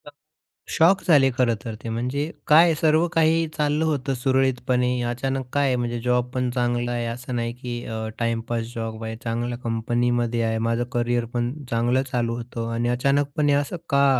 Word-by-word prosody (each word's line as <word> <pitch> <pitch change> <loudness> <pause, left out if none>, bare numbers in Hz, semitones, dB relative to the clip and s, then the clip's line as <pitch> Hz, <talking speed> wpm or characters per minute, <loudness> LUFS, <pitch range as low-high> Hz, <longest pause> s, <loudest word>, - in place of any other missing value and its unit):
अ, - - -9 0.6
shock 180 +4 +4
झाले 145 -6 +5
खरं 120 -3 +3
तर, 115 -2 -5
ते. 115 - -4
म्हणजे 125 +7 -2 0.2
काय? 165 +2 +7
सर्व 160 +2 +3
काही 165 0 +3
चाललं 150 +1 +1
होतं 140 -3 0
सुरळीतपणे, 130 -1 +1 0.2
अचानक 135 +2 -2
काय 145 0 +2
आहे? 130 - +2
म्हणजे 120 -1 -2
जॉबपण 125 +1 0
चांगला 120 -1 0
आहे. 120 -1 -2
असं 120 +2 -5
नाही, 115 0 -2
की 120 -1 -6
अ, 110 -1 -4
टाईमपास 115 0 -1
जॉब 115 -1 -5
आहे. 110 0 -4
चांगल्या 120 +1 -2
कंपनीमध्ये 120 +1 0
आहे. 110 0 0
माझं 115 +1 +1
करिअर 120 0 0
पण 120 0 -1 0.2
चांगलं 120 +3 +1
चालू 115 -2 0
होतं 115 -1 -5
आणि 120 +1 0
अचानकपणे 140 +3 +1
"असं 145 +4 0
का?" 140 0 +4
125 Hz, 170 wpm, -24 LUFS, 120-140 Hz, 0.6 s, काय